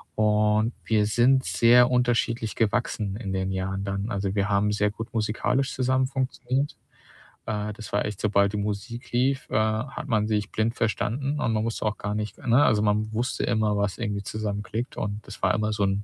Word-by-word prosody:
und 105 +1 +2
wir 105 -2 +2
sind 125 +5 +3
sehr 120 +1 +5
unterschiedlich 120 -2 +1
gewachsen 110 -3 0
in 100 -4 -5
den 95 0 -1
Jahren 95 +1 -2
dann. 100 +2 -3
Also, 100 -1 -2
wir 100 0 +1
haben 100 +1 +2
sehr 105 0 +1
gut 115 +2 -8
musikalisch 115 +5 0
zusammen 130 0 +1
funktioniert. 130 +1 -2 0.7
Äh, 105 -1 -3
das 105 0 -10
war 105 - +1
echt, 105 -3 -4
sobald 100 -1 +2
die 105 - -1
Musik 105 +4 -4
lief, 130 +3 +1
äh, - - -3
hat 110 +7 -1
man 110 -3 +1
sich 105 -1 -1
blind 110 +2 0
verstanden 135 +6 -1
und 115 -6 0
man 110 0 0
musste 115 -1 -3
auch 105 -2 -1
gar 105 0 -3
nicht, 105 0 -3
für - - -11
ne, 125 +5 +6
also, 105 - +3
man 105 +1 +1
wusste 120 +4 -1
immer, 105 -1 +1
was 100 -2 -1
irgendwie 105 -3 -3
zusammen 105 0 -3
klickt 115 +3 -5
und 105 0 -4
das 100 - -10
war - - +4
immer 110 0 0
so 105 -1 0
'n 100 +1 0
110 Hz, 200 wpm, -26 LUFS, 105-120 Hz, 0.7 s, ne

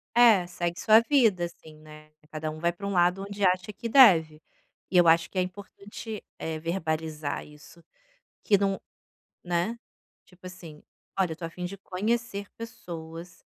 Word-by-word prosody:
É, 225 -7 +6
segue 175 -1 -3
sua 220 +1 +6
vida 230 -9 +3
assim, 160 -2 -12
né, 155 0 -15 0.2
cada 155 0 -4
um 155 - -7
vai 170 +1 +1
pra 200 +3 -9
um 200 - -2
lado 180 +1 +2
onde 200 0 -5
acha 185 +2 +2
que 220 +3 -6
deve, 165 - +6 0.5
e 185 - +2
eu 175 -1 +6
acho 165 +1 +4
que - - -9
é 185 - +4
importante, 200 +3 -8 0.2
eh, 160 -1 -4
verbalizar 160 -3 -3
isso, 150 +3 -16 0.6
que 205 - +4
não 195 0 -1 0.6
né, 175 +6 -1 0.5
tipo 185 0 -17
assim: 170 -4 -11 0.4
"Olha, 185 -3 +2
eu - - -3
estou 165 +1 -6
afim 180 +2 -7
de 185 +3 -5
conhecer 205 +2 -3
pessoas.", 170 -6 -9
180 Hz, 165 wpm, -27 LUFS, 160-200 Hz, 0.6 s, É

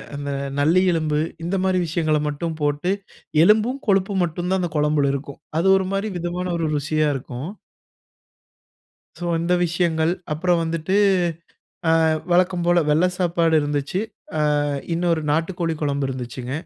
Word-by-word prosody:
இந்த 145 0 -4 0.3
நல்லி 165 +6 +4
எலும்பு 155 -2 0 0.2
இந்த 175 +4 -1
மாரி 190 -1 +2
விஷயங்கள 155 -1 +1
மட்டும் 155 +2 -3
போட்டு, 145 +5 0 0.5
எலும்பும், 220 +8 +3
கொழுப்பும் 195 -1 +2
மட்டும் 175 +1 -3
தான் 190 - +2
அந்த 175 -3 -2
குழம்புல 150 -2 +2
இருக்கும். 140 0 -6 0.2
அது 190 - +1
ஒரு 190 - -1
மாரி 200 +2 -1
விதமான 175 +1 -3
ஒரு 165 -2 -1
ருசியா 155 +2 0
இருக்கும். 130 +1 -6 1.7
சோ 175 - -4
இந்த 170 +2 +1
விஷயங்கள். 170 -1 +1 0.2
அப்புறம் 175 +2 +1
வந்துட்டு 165 +3 -1 1.1
அ - - +4 0.3
வழக்கம் 180 0 +2
போல 175 0 +4
வெள்ள 155 +4 +4
சாப்பாடு 170 -2 +2
இருந்துச்சி. 145 +5 -2 0.6
ஆ - - 0 0.3
இன்னொரு 170 -1 +1
நாட்டுக்கோழி 165 +1 -1
குழம்பு 140 -2 0
இருந்துச்சுங்க. 125 0 -5
165 Hz, 135 wpm, -22 LUFS, 150-180 Hz, 1.7 s, நல்லி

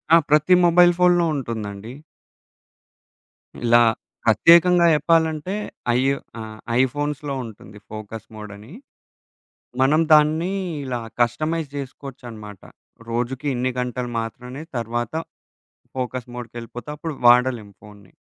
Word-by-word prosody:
ఆ! - - +9
ప్రతి 150 +4 +4
మొబైల్ 175 +1 +6
ఫోన్‌లో 175 -1 +4
ఉంటుందండి. 110 -4 -5 1.7
ఇలా 120 0 +6 0.4
ప్రత్యేకంగా 170 - +5
జెప్పాలంటే 160 +2 +1 0.4
ఐ - - +3 0.4
ఆహ్. 110 0 -9 0.2
ఐఫోన్స్‌లో 145 +2 -2
ఉంటుంది 105 -1 -12
ఫోకస్ 110 0 -8
మోడ్ 105 -1 -9
అని. 110 - -14 1.1
మనం 145 +4 +4
దాన్ని 155 +4 +4 0.3
ఇలా 125 -2 -3 0.2
కస్టమైజ్ 155 +6 0
జేసుకోవచ్చన్నమాట 120 -7 -9 0.5
రోజుకి 125 +4 -3
ఇన్ని 125 +1 -1
గంటలు 125 0 -3
మాత్రమే 125 +5 -7 0.2
తర్వాత 120 +2 -3 0.8
ఫోకస్ 125 -1 -4
మోడ్‌కెళ్ళిపోతే 120 +2 -8
అప్పుడు 160 0 -5
వాడలేము 120 -4 +4
ఫోన్ని. 105 -3 -16
125 Hz, 100 wpm, -22 LUFS, 115-150 Hz, 1.7 s, ఆ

